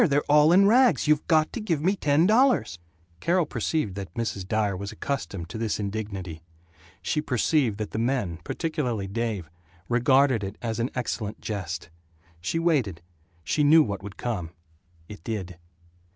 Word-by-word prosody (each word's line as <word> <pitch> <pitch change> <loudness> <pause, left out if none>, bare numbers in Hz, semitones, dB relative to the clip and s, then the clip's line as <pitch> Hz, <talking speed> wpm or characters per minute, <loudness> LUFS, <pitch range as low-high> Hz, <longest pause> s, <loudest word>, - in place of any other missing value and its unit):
They're 145 -7 +3
all 150 +2 +5
in 190 +3 +6
rags. 235 - +4
You 150 -1 +4
got 155 -3 +3
to 235 - -4
give 170 -8 0
me 185 +7 +1
ten 150 -2 +2
dollars 225 - +3 0.2
" 85 0 -35
Carol 175 - +2
perceived 120 - -2
that 95 -3 -7
Mrs. 110 -5 -3
Dyer 105 -1 0
was 100 +2 -5
accustomed 100 -11 -4
to 110 - -6
this 110 -2 -1
indignity. 100 -5 -5 0.6
She 150 - 0
perceived 130 -4 +1
that 110 -1 -4
the - - -3
men, 115 -9 -1
particularly 125 - -2
Dave, 105 -3 -3 0.4
regarded 125 -1 +3
it 100 +2 -5
as 115 -1 -3
an 120 +2 0
excellent 115 -4 -3
jest. 90 -5 -5 0.5
She 85 - -2
waited 135 - 0 0.4
she 150 - +1
knew 155 +2 +7
what 100 -6 -4
would 100 0 -9
come 105 -9 -3 0.6
it 105 - -11
did. 95 -6 -5
115 Hz, 165 wpm, -26 LUFS, 100-150 Hz, 0.6 s, knew